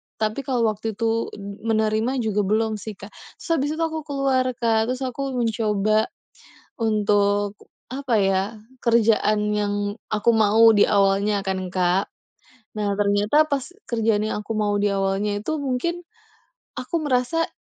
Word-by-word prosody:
tapi 215 +3 -2
kalau 250 -3 +1
waktu 215 +1 -5
itu 230 +1 0
m 200 0 -8 0.2
menerima 220 +4 0
juga 210 -1 0
belum 215 +1 0
sih, 215 +1 -7
Kak. 200 +2 -12 0.2
Terus - - -12
abis 285 +2 0
itu 330 - -1
aku 320 -1 -2
keluar, 275 -2 +1
Kak, 225 -2 +1
terus 255 +1 -3
aku 265 +1 -3
mencoba 215 -2 +1 0.7
untuk, 205 -2 +1 0.3
apa 265 -2 -2
ya, 195 -1 +2 0.4
kerjaan 215 -3 +2
yang 205 -1 0 0.3
aku 215 +2 +1
mau 220 0 +5
di 205 -2 +5
awalnya 200 0 +2
kan, 190 -1 -2
Kak. 180 +1 +1 0.7
Nah, 205 -2 -2
ternyata 205 +9 +3
pas 280 0 -2 0.2
kerjaan 225 -2 +1
yang 215 -1 -2
aku 215 +1 -4
mau 210 -1 +1
di 205 - +2
awalnya 195 +1 0
itu 290 +9 -3
mungkin 280 +7 -2 0.8
aku 255 +7 -2
merasa 290 +3 0
215 Hz, 145 wpm, -23 LUFS, 205-250 Hz, 0.8 s, mau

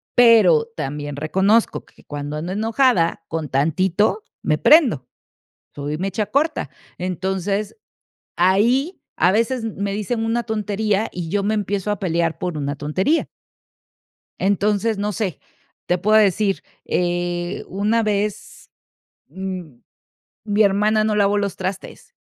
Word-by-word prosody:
Pero 245 - +6
también 145 +1 -4
reconozco 190 +9 +1
que - - -22
cuando 145 0 -6
ando 170 +4 -4
enojada, 220 -5 +1
con 160 -2 -3
tantito 185 - +1 0.2
me - - +1
prendo, 245 - +4 0.7
soy 145 +1 -4
mecha 195 +3 -2
corta, 315 +4 0 0.3
entonces, 190 - -2 0.6
ahí, 235 - +2 0.2
a 180 +3 +4
veces 230 +3 0
me 200 -2 -3
dicen 225 +3 -2
una 235 +1 0
tontería 215 -1 -1
y 175 -2 -5
yo 200 +3 0
me 215 +2 0
empiezo 205 -1 -2
a 205 - -1
pelear 170 -3 -1
por 175 -3 -3
una 145 0 -3
tontería. 185 - 0 1.1
Entonces, 205 +2 +1
no 205 +1 -1
sé, 195 -5 -3 0.5
te 180 - +1
puedo 215 +4 +3
decir, 200 -1 +2 0.2
eh, 175 0 -2
una 210 +4 0
vez 210 -1 -3 0.6
m 180 -6 -7 0.6
mi 210 0 +2
hermana 210 +2 +3
no 215 0 +1
lavó 205 0 +2
los 200 -2 -2
trastes, 190 0 -6
200 Hz, 125 wpm, -21 LUFS, 175-215 Hz, 1.1 s, Pero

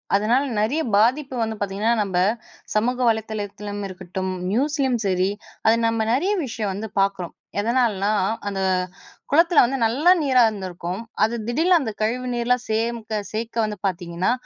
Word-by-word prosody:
அதனால் 230 +7 +2 0.2
நிறைய 265 +10 +1
பாதிப்பு 255 +6 +2
வந்து 220 0 -3
பார்த்தீங்கன்னா, 205 +3 0
நம்ப 185 -3 -3 0.6
சமூக 245 +4 +1
வலைதளத்திலும் 205 -2 -3
இருக்கட்டும், 185 0 -5 0.2
நியூஸ்லயும் 265 0 +1
சரி, 185 0 +1 0.4
அது 225 - +6
நம்ம 225 0 0
நிறைய 355 +11 +1
விஷயம் 220 -5 -3
வந்து 215 +3 -5
பாக்குறோம். 195 -3 0 0.3
எதனாலனா, 215 -3 +1 0.4
அந்த 195 -1 -2 0.7
குளத்தில 335 +2 +5
வந்து 265 +3 -1
நல்ல 265 +10 +3
நீரா 260 -4 +4
இருந்திருக்கும். 185 -2 -4 0.2
அது 225 +2 +1
திடீர்னு 325 +9 +3
அந்த 230 -6 -3
கழிவு 240 +4 0
நீர்லாம் 245 +1 +1
சேர்க்க 220 -1 -1
சேர்க்க 225 +1 -2
வந்து 210 -1 -4
பார்த்தீங்கன்னா, 175 +1 -1
220 Hz, 135 wpm, -23 LUFS, 200-250 Hz, 0.7 s, அது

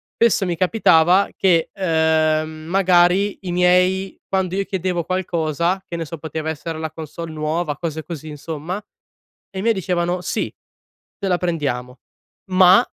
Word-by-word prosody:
spesso 230 -4 +3
mi 175 -2 -1
capitava 180 -1 +4
che, 170 -4 +2
ehm, 160 -4 +2
magari 180 +4 +2
i 180 - -4
miei 180 +2 +2
quando 190 -1 0
io 200 - +1
chiedevo 180 -3 -2
qualcosa 175 0 -1
che 170 - -5
ne 165 - -3
so, 165 +2 -7
poteva 160 0 -4
essere 160 +1 -5
la 160 0 -3
consolle 160 +1 -7
nuova, 155 0 -2
cose 160 -1 -4
così 155 -2 -7
insomma, 155 +4 -5 0.7
e 190 - -6
i - - -2
miei 230 +1 +3
dicevano: 180 -1 -1
"Sì, 180 - -2 0.6
te 200 - -3
la 180 -2 +2
prendiamo, 135 -8 -2 0.5
ma 185 +5 +6
175 Hz, 150 wpm, -21 LUFS, 160-185 Hz, 0.7 s, ma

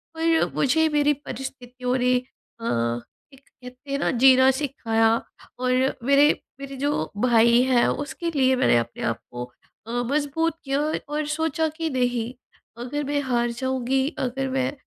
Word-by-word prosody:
पर 325 0 +2
मुझे 320 +4 +3
मेरी 295 -1 +3
परिस्थितियों 255 -2 -5
ने 250 0 +2 0.5
अ, 230 - -7 0.7
एक 270 - -16
कहते 255 +2 -13
हैं 280 - 0
ना - - +1
जीना 260 0 +7
सिखाया। 225 -5 +1 0.5
और 255 0 0 0.3
मेरे 280 +3 +5 0.3
मेरे 275 0 -7
जो 285 - -1 0.2
भाई 235 0 +5
हैं 255 -2 +3 0.2
उसके 335 +3 -4
लिए 260 -1 +3
मैंने 255 - +3
अपने 115 0 -3
आप 115 -1 -1
को 120 0 -5 0.4
अ, - - -6 0.2
मज़बूत 300 +3 0
किया 275 0 -1 0.3
और 300 +1 -2
सोचा 320 0 0
कि 325 -1 -1
नहीं 245 -3 -1 0.5
अगर 290 +4 -3
मैं 290 +1 -1
हार 240 -3 0
जाऊँगी 260 +2 -1
अगर 265 +1 -2
मैं 260 0 0
265 Hz, 150 wpm, -24 LUFS, 245-290 Hz, 0.7 s, जीना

